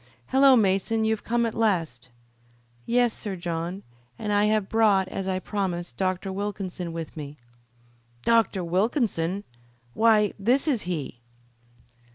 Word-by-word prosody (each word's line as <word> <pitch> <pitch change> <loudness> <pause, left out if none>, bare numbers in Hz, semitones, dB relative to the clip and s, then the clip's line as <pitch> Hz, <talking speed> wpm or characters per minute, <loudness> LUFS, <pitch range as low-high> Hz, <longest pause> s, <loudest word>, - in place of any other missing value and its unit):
"Hullo, 270 0 +6
Mason, 215 +1 +2
you've 220 -1 0
come 235 0 +1
at 225 - -2
last!" 165 - -1 0.8
"Yes, 240 -1 +3
Sir 205 -4 -5
John, 175 +2 -4 0.3
and 210 -1 -2
I 205 0 +3
have 210 -2 +1
brought, 205 -4 +3
as 195 0 -4
I 190 -1 0
promised, 185 -3 -3
Dr. 190 0 -2
Wilkinson 190 -3 -4
with 165 -2 -6
me." 150 -1 -8 0.9
"Dr. 225 -5 +2
Wilkinson! 190 - 0 0.5
Why, 215 - +4
this 245 +9 +2
is 260 -8 +1
he." 145 -8 -4
195 Hz, 130 wpm, -25 LUFS, 180-225 Hz, 0.9 s, Hullo